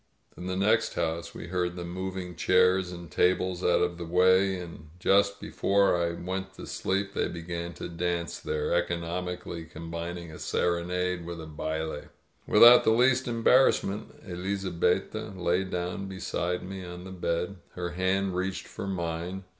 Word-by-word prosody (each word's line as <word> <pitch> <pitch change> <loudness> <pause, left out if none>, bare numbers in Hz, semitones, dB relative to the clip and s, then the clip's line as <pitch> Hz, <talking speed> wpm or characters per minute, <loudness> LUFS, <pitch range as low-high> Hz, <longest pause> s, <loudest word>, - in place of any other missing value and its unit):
In 90 - -7
the 95 - -2
next 110 +3 +2
house 85 +1 -2
we 85 - -7
heard 90 -1 -1
them 85 -1 -6
moving 95 -1 -4
chairs 90 +1 +3
and 85 -2 -9
tables 90 0 +1
out 90 - +4
of 90 0 -2
the - - -3
way; 95 +2 +4
and 85 -3 -9
just 100 +2 +3
before 100 -1 +2
I 85 -1 0
went 95 +2 -5
to - - -8
sleep 100 +1 -1
they - - 0
began 85 0 -5
to - - -6
dance 85 0 -2
there, 75 +1 -1
eco 85 0 +1
nomically 85 -1 -5
combining 85 +1 -6
a 75 - -10
serenade 90 +1 0
with 85 0 -6
a 80 - -7
baUe. 80 0 -4 0.4
Without 120 +3 +9
the - - +3
least 125 +3 +4
embarrassment, 115 -3 +3
Elizabetta 95 +2 -1
lay 90 +2 +2
down 90 +1 -3
beside 90 -2 -2
me 95 0 -6
on 90 0 -8
the 95 - -9
bed. 90 +1 -2 0.2
Her 90 -1 -3
hand 95 +1 0
reached 95 +1 -2
for - - -6
mine. 85 0 -3
90 Hz, 160 wpm, -28 LUFS, 85-95 Hz, 0.4 s, Without